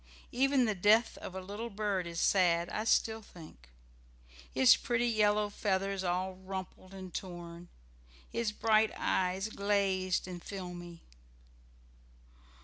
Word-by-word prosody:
Even 265 +1 +3
the 215 - +1
death 210 +5 +4
of 185 - -8
a - - -3
little 205 +5 -6
bird 200 -4 -2
is 170 -1 -5
sad, 175 -3 +3
I 215 - -3
still 225 0 +2
think. 155 - -14 0.8
His 130 -1 +6
pretty 240 0 0
yellow 210 -2 +2
feathers 195 -1 -1
all 185 +1 -1
rumpled 185 0 -8
and 185 -2 -9
torn, 175 -1 -7 0.6
his 230 -2 -2
bright 215 0 +3
eyes 190 +3 0
glazed 195 -3 0
and 180 -2 -7
filmy. 175 -3 -8
190 Hz, 125 wpm, -32 LUFS, 180-210 Hz, 0.8 s, His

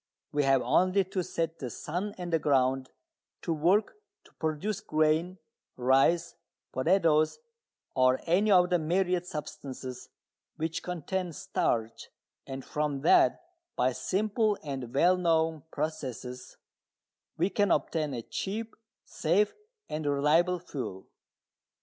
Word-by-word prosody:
We 145 - +1
have 135 -2 +4
only 185 +2 +3
to 190 0 -3
set 165 -1 -3
the 130 - -4
sun 180 - -4
and 175 -2 -5
the 165 - +4
ground 130 -2 +2 0.5
to 170 - 0
work 185 - +2 0.3
to - - -22
produce 160 +6 -1
grain, 155 +4 +1 0.4
rice, 135 +7 +3 0.4
potatoes, 155 - +3 0.6
or 130 0 +3
any 185 +6 +3
of 180 -2 +5
the 175 - +3
myriad 180 +2 0
substances 135 -5 -7 0.5
which 160 +1 -3
contain 180 +1 -3
starch, 115 -5 -2 0.4
and 135 0 -6
from 150 -2 -2
that, 355 - +4 0.3
by 130 - +2
simple 210 - 0
and 135 -5 -5
well 180 +6 +5
known 160 -3 +1
processes, 130 -5 -5 0.8
we 180 +5 +1
can 205 -2 +2
obtain 150 -1 0
a 115 - -5
cheap, 220 - -4 0.3
safe 190 +6 +1 0.3
and 155 -1 -3
reliable 155 +6 +3
fuel. 135 - -6
160 Hz, 120 wpm, -29 LUFS, 140-180 Hz, 0.8 s, of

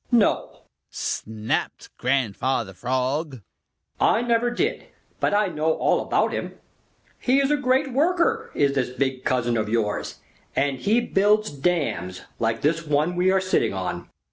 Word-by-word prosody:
"No!" 235 -4 +2 0.3
snapped 110 0 -3
Grandfather 125 -3 0
Frog. 130 - -2 0.6
"I 230 - +3
never 240 0 +2
did, 240 - -1 0.3
but - - +1
I 205 -1 +2
know 160 -1 0
all - - +1
about - - +1
him. - - -4 0.6
He 260 +2 +3
is 275 +1 +2
a - - +4
great 265 -1 +1
worker, 360 - +1
is 140 -1 +2
this 130 -3 0
big 130 0 -2
cousin 120 -2 +1
of 110 -1 -1
yours, 110 -2 -1 0.4
and 135 -1 0
he 220 - +2
builds 210 0 +2
dams 140 - -1 0.2
like 115 0 0
this 160 +3 +1
one 150 +3 +1
we 180 +1 +3
are 190 0 +4
sitting 185 0 +1
on." - - -4
150 Hz, 145 wpm, -24 LUFS, -, 0.6 s, a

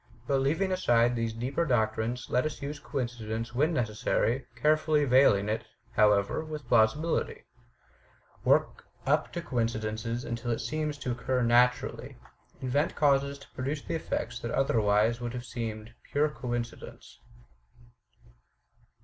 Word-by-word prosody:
But 135 -1 +1
leaving 165 +8 +1
aside 120 -9 +3
these 115 -1 -1
deeper 125 +8 -1
doctrines, 120 -2 0
let 125 - +1
us 155 - -4
use 145 +2 -5
coinci 120 -6 -4
dence 115 +2 -3
when 150 +7 +2
necessary, 120 -1 0
carefully 150 +3 +2
veiling 125 -6 +5
it, 110 +1 -1 0.3
however, 105 +6 +3
with 155 -4 -7
plausibility. 125 +8 +2 1.0
Work - - +2 0.2
up - - +1
to - - -3
the - - -16
coincidence 110 -3 -2 0.2
until 120 +1 -4
it 115 - +1
seems 150 +4 -3
to 130 -3 -3
occur 125 +1 -1
naturally. 125 +1 +2 0.4
Invent 135 +4 0
causes 140 -1 +2
to 140 - -17
produce 140 +3 -3
the - - -4
effects 120 -7 -3
that 115 - -4
otherwise 115 -2 +2
would 120 0 -4
have 125 0 -5
seemed 115 -2 -5 0.2
pure 150 +2 +2
coincidence. 120 -4 -6
125 Hz, 135 wpm, -29 LUFS, 115-140 Hz, 1.0 s, veiling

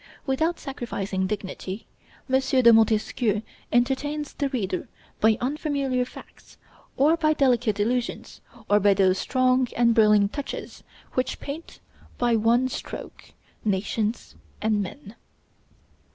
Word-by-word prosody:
Without 315 +5 0
sacrificing 200 -8 -3
dignity, 195 0 -5 0.4
M. 265 0 +3
de 260 -3 +5
Montesquieu 220 0 +2 0.3
entertains 280 +4 0
the 280 -2 -1
reader 195 -9 -2 0.3
by 220 0 +4
unfamiliar 275 -2 -1
facts, - - -15 0.4
or 300 +5 +5
by 310 -2 +2
delicate 245 -7 +2
allusions, 240 +3 -2 0.3
or 205 0 +4
by 200 0 +4
those 190 -1 +3
strong 255 0 +2
and 235 -1 +4
brilliant 210 -3 +4
touches 285 -2 -6 0.3
which 255 - -1
paint, 300 +4 -8 0.4
by 240 -1 +2
one 230 +3 +3
stroke, - - -7 0.4
nations 210 +2 -1 0.3
and 215 -1 +1
men. 205 +3 -8
240 Hz, 115 wpm, -25 LUFS, 210-265 Hz, 0.4 s, de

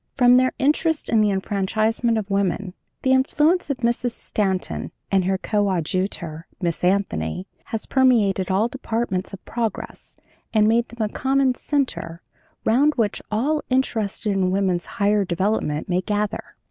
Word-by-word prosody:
From 245 -1 +6
their 255 0 +3
interest 300 +3 +1
in 225 -2 +4
the 210 - +3
enfranchisement 215 +4 0
of 210 -3 -2
women, 195 -1 -1 0.3
the 260 - +2
influence 300 +6 +2
of 280 - -1
Mrs. 240 0 0
Stanton 190 -3 -2 0.2
and 190 -2 +3
her 190 +1 +1
coadjutor, 185 -4 -1
Miss 170 -3 -2
Anthony, 95 - 0 0.2
has 225 - -4
permeated 220 -8 +3
all 195 +4 +2
departments 230 -6 -3
of 195 - -10
progress 230 -4 -4 0.4
and 210 -1 +5
made 235 +2 +3
them 230 -2 -2
a - - -13
common 270 0 +2
center 250 - -2 0.4
round 280 +7 +3
which 220 -5 0
all 280 +8 0
interested 225 -5 0
in 190 -2 +1
woman's 185 -2 0
higher 205 -1 +3
development 180 -4 -1
may 180 0 +1
gather.' 205 +2 -3
210 Hz, 145 wpm, -22 LUFS, 190-245 Hz, 0.4 s, From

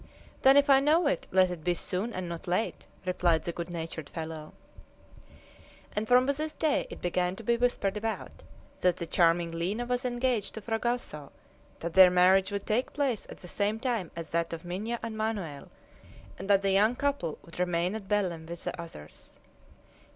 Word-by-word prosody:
"Then 270 +1 +7
if 285 +1 +5
I 270 -1 +7
know 310 +5 +3
it, 285 - 0
let 185 -1 +4
it 170 -3 -6
be 175 +1 +1
soon 185 +7 -2
and 185 -4 -4
not 170 0 -7
late!" 180 +6 -1 0.2
replied 175 -3 +2
the 170 - -2
good 170 +1 -6
natured 165 -3 -5
fellow. 160 -2 -6 1.4
And 210 +1 -1
from 250 +1 +5
this 300 +3 -1
day 310 -2 +1
it - - -10
began 180 +1 0
to 225 - -10
be 235 +2 +2
whispered 235 -5 0
about 220 +1 -4 0.4
that 180 -2 +2
the 170 - -4
charming 170 0 +2
Lina 185 +8 -2
was 245 +1 -1
engaged 245 -3 0
to 220 - -6
Fragoso, 225 - -2 0.5
that 170 0 -4
their 185 0 +9
marriage 185 +2 +4
would 200 -1 -3
take 230 +4 0
place 270 -7 -1
at - - -9
the 180 - -11
same 205 +4 0
time 230 -8 -1
as 165 -1 -6
that 170 0 0
of 165 +1 -7
Minha 210 +7 -3
and 225 -1 -4
Manoel, 205 -10 -3 0.7
and 195 +2 -7
that 200 -1 +5
the 195 - +2
young 210 +5 +4
couple 280 - -1
would 170 +1 -11
remain 180 +1 +1
at 215 -3 -6
Belem 180 -6 -1
with 170 0 -6
the - - -4
others. 75 - -12
190 Hz, 190 wpm, -29 LUFS, 170-235 Hz, 1.4 s, their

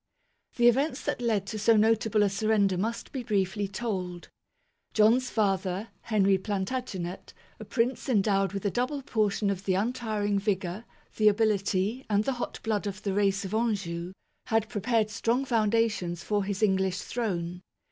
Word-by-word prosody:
The 240 0 +4
events 270 +3 +2
that 290 -4 -2
led 220 -5 +1
to 215 +1 -5
so 225 +1 +4
notable 220 -1 +3
a 205 - +3
surrender 200 -1 +2
must 220 +6 -3
be 265 - -4
briefly 200 -3 0
told. 190 -4 -4 0.7
John's 230 +4 +4
father, 195 -1 0
Henry 195 -3 +2
Planta 205 +6 -2
genet, 180 -5 -6 0.3
a - - -8
prince 250 +3 -1
endowed 195 -4 +2
with 195 0 -5
a 200 - +2
double 255 +5 -1
portion 210 -4 +1
of 195 0 -5
the. 185 - +2
untiring 210 -2 0
vigour, 195 0 -2 0.3
the 215 - +4
ability, 210 +2 +1
and 205 0 +2
the 270 - 0
hot 245 - -5
blood 215 -2 -1
of 195 0 -6
the 200 - -1
race 200 0 +1
of 190 - -6
Anjou, 195 -6 -1 0.3
had 220 -1 +1
prepared 220 0 0
strong 230 +4 0
foundations 220 -7 +1
for 205 -2 0
his 200 +1 -2
English 190 -2 +2
throne. 180 -7 -3
210 Hz, 160 wpm, -28 LUFS, 195-230 Hz, 0.7 s, The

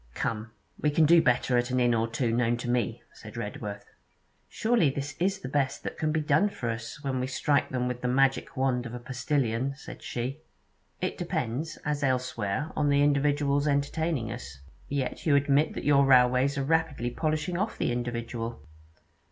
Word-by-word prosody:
'Come, 115 0 -2 0.3
we 150 - +2
can 155 +2 +4
do 170 +2 +7
better 125 -1 +2
at 120 +1 -1
an 125 0 +1
inn 120 -1 +3
or 115 0 +1
two 115 0 -1
known 120 0 +1
to 120 - -6
me,' 120 -3 -1
said - - -11
Redworth. 105 0 -5 0.6
'Surely 225 -9 +2
this 140 +1 -4
is 190 +2 0
the - - -5
best 135 0 -1
that - - -4
can 155 -1 +1
be 160 0 +1
done 150 +7 +3
for 120 -11 -3
us, 115 +6 -7
when 135 -2 -1
we 125 - -1
strike 135 +2 +1
them 125 -1 -1
with 125 0 -4
the 125 - -1
magic 135 +1 +1
wand 125 -2 +1
of 120 - -7
a - - -5
postillion?' 130 0 -1
said 150 - -10
she. 125 +5 -4 0.6
'It - - -2
depends, 125 +7 -2
as 150 -1 -1
elsewhere, 130 0 -1
on 145 -1 +2
the 140 0 +4
individuals 145 0 +2
entertaining 145 -2 0
us.' 70 +2 -8 0.3
'Yet 140 +2 -2
you 145 - +5
admit 145 +2 +3
that - - -5
your 140 -1 +5
railways 130 +1 +4
are 135 - 0
rapidly 155 -5 0
"polishing 155 +5 -1
off" 210 +3 -2
the - - 0
individual.' 120 -5 -4
135 Hz, 185 wpm, -28 LUFS, 120-145 Hz, 0.6 s, do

